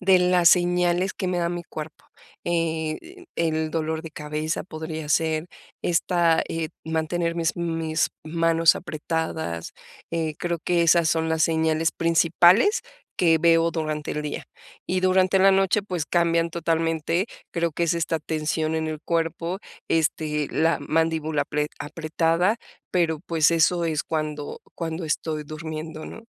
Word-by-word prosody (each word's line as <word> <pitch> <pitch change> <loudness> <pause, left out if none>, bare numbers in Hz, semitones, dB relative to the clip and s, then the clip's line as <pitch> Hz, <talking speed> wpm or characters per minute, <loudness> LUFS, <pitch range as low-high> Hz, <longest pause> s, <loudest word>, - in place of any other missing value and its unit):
de 190 -1 +5
las 180 -1 +5
señales 180 +1 +3
que 185 - -2
me 180 -1 0
da 170 0 +1
mi 175 0 -4
cuerpo, 155 -2 -8 0.4
eh, 165 - -2
el 160 -1 0
dolor 160 0 -2
de 165 - -8
cabeza 155 +2 -3
podría 160 -2 -6
ser 160 +1 +1 0.3
esta 170 -1 +2
eh, 165 -1 -3
mantener 165 +1 -1
mis 165 -1 0
mis 165 -2 -1
manos 165 0 +3
apretadas, 160 - -4 0.4
eh, 160 -2 -1
creo 175 -1 -2
que 170 +1 +1
esas 170 0 +4
son 160 0 +1
las 160 0 +2
señales 160 0 +1
principales 175 - +4 0.4
que 165 -2 +4
veo 165 0 +4
durante 155 -2 -3
el 150 - -3
día. 150 - -4 0.4
Y 185 - +1
durante 185 +1 +3
la 195 +1 +6
noche, 195 +1 +3
pues 180 -6 -3
cambian 170 0 +2
totalmente, 165 +2 0 0.3
creo 170 -1 0
que 170 +3 -1
es 170 - +1
esta 165 -1 0
tensión 155 0 -1
en 160 0 -1
el 155 -1 -5
cuerpo, 165 +2 -1 0.3
este, 155 -2 0
la 160 -1 +2
mandíbula 160 -1 0
apre 150 +1 -2
apretada, 165 +6 0 0.3
pero, 165 -4 +1
pues 165 -2 +2
eso 170 +1 +3
es 155 -2 0
cuando 150 -2 -4
cuando 165 0 -4
estoy 155 0 -2
durmiendo, 155 +1 -6
¿no? 225 - -10
165 Hz, 145 wpm, -24 LUFS, 155-170 Hz, 0.4 s, la